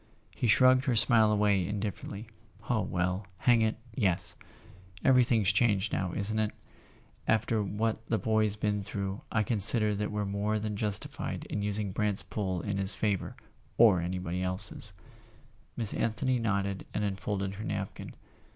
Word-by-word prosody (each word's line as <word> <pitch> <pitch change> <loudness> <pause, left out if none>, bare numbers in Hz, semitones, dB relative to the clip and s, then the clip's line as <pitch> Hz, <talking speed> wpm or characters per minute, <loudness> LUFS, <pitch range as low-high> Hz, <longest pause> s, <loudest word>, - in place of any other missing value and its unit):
He 120 - -1
shrugged 130 +4 +5
her 130 -4 +1
smile 110 -1 +5
away 105 -2 +2
indifferently. 100 +2 -4 0.4
"Oh, 110 -3 +1
well—hang 95 +6 0
it, 110 0 +1 0.2
yes! 100 -7 -1 0.7
Everything's 120 -6 +4
changed 105 -4 +2
now, 95 -2 -1
isn't 110 +2 -2
it? 110 -1 +1 0.8
After 110 0 +2
what 110 +3 -2
the 110 - +1
boy's 110 -1 +1
been 105 -1 -1
through 100 0 -4
I 110 - +2
consider 105 0 +5
that 105 +1 -2
we're 105 -1 -2
more 100 +2 -1
than 105 0 -3
justified 100 -1 -4
in 105 - -2
using 105 -1 -1
Brant's 105 -1 -1
pull 95 -1 -3
in 100 -1 -2
his 95 +1 +3
favour—or 105 0 +1
anybody 90 0 -3
else's." 90 0 -2 0.8
Miss 110 -3 -3
Anthony 120 +3 0
nodded 100 -3 -1
and 105 - 0
unfolded 100 -1 -2
her 105 +2 -7
napkin. 100 -2 -5
105 Hz, 140 wpm, -30 LUFS, 100-110 Hz, 0.8 s, shrugged